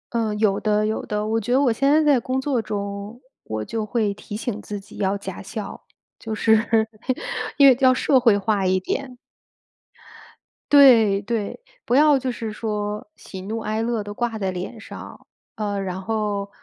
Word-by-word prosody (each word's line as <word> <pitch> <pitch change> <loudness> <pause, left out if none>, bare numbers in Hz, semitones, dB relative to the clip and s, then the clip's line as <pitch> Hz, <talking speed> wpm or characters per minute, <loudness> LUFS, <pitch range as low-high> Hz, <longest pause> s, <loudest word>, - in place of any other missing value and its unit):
呃， 225 -3 0
有 210 -2 +2
的 210 0 +1
有 215 +1 -2
的。 210 0 -2
我 220 +1 0
觉 235 +3 -2
得 265 - +4
我 265 -4 +3
现 275 +5 +1
在 310 +2 +4
在 290 -4 +4
工 255 +3 -2
作 265 -4 0
中， 200 +2 -5 0.2
我 110 0 -4
就 220 - -3
会 215 -2 0
提 205 - -9
醒 215 -1 -4
自 205 - -6
己 195 0 -13
要 195 +1 0
假 195 -2 -7
笑， 205 +2 -7 0.4
就 220 -1 -4
是， 220 0 +3 0.7
因 280 - +7
为 260 -3 +6
要 260 -2 +5
社 260 +1 +3
会 230 -5 +4
化 205 -1 0
一 185 0 +3
点。 250 +6 -4 1.5
对 230 -9 +7
对。 215 - -3 0.2
不 245 - +1
要 295 0 +6
就 260 -1 -2
是 225 -3 -5
说， 210 -1 -3
喜 190 - -9
怒 215 +4 -4
哀 220 0 -2
乐 230 -1 -1
都 205 - -6
挂 230 0 -2
在 190 -2 -1
脸 185 +5 -6
上。 - - -11 0.3
呃， 205 -2 -2
然 190 -1 -4
后， 205 -1 -2
220 Hz, 195 characters per minute, -22 LUFS, 205-240 Hz, 1.5 s, 因